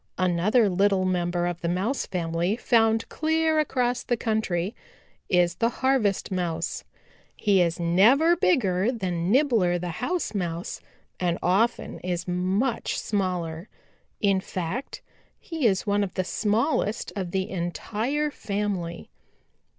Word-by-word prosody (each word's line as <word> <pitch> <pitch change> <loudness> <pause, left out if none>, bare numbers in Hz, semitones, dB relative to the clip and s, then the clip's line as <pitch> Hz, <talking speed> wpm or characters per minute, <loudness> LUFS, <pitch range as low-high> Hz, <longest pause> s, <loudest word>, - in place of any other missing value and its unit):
"Another 185 +6 +3
little 195 0 +2
member 175 -1 0
of 175 -1 -3
the 170 - -2
Mouse 195 +10 -1
family 170 +2 -1
found 225 -1 +2
clear 315 0 +1
across 250 -4 0
the 240 - -1
country 215 -4 -1 0.6
is 175 -2 +3
the 230 - +2
Harvest 240 -7 0
Mouse. 170 -3 -2 0.5
He 200 -3 +3
is 170 -1 0
never 225 - +5
bigger 215 - +2
than 180 -7 -2
Nibbler 230 -9 +3
the 175 0 -4
House 360 -7 -1
Mouse 175 -3 -3 0.4
and 175 -2 0
often 210 +7 +1
is 175 -1 -3
much 190 +7 0
smaller. 180 -3 -2 0.5
In 195 -2 +3
fact, 185 +9 -5 0.4
he 320 -7 -1
is 190 -3 +1
one 205 0 +2
of 195 - -5
the 185 - 0
smallest 215 - 0
of 190 -3 -3
the 190 +2 -1
entire 225 - -2
family. 200 -7 -3
195 Hz, 125 wpm, -26 LUFS, 175-235 Hz, 0.6 s, never